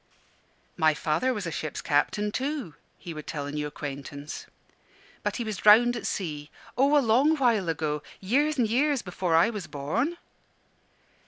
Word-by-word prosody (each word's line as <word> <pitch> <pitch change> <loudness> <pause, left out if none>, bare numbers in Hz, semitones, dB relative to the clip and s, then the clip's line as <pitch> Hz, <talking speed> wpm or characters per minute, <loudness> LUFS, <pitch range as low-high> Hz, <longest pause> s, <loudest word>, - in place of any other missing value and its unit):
"My 155 -2 +4
father 160 +13 0
was 210 -6 -3
a 165 - -3
ship's 155 -1 -4
captain, 205 +8 +1
too," 265 - -3 0.2
he 170 - -8
would 155 -1 -9
tell 145 -3 -4
a 145 - -5
new 150 0 -2
acquaintance, 145 +1 -7 0.7
"but - - -2
he 240 - -2
was 215 -3 -4
drowned 235 +5 +6
at 235 - -4
sea 150 -6 -4 0.3
oh, 275 +4 +4
a 280 - +3
long 265 +8 +4
while 230 - +2
ago; 150 -2 -1 0.2
years 285 +10 +1
and 240 -3 +3
years 270 +4 +1
before 180 -2 -1
I 170 +8 +5
was 205 -5 -6
born." 225 - -2
200 Hz, 165 wpm, -27 LUFS, 150-245 Hz, 0.7 s, drowned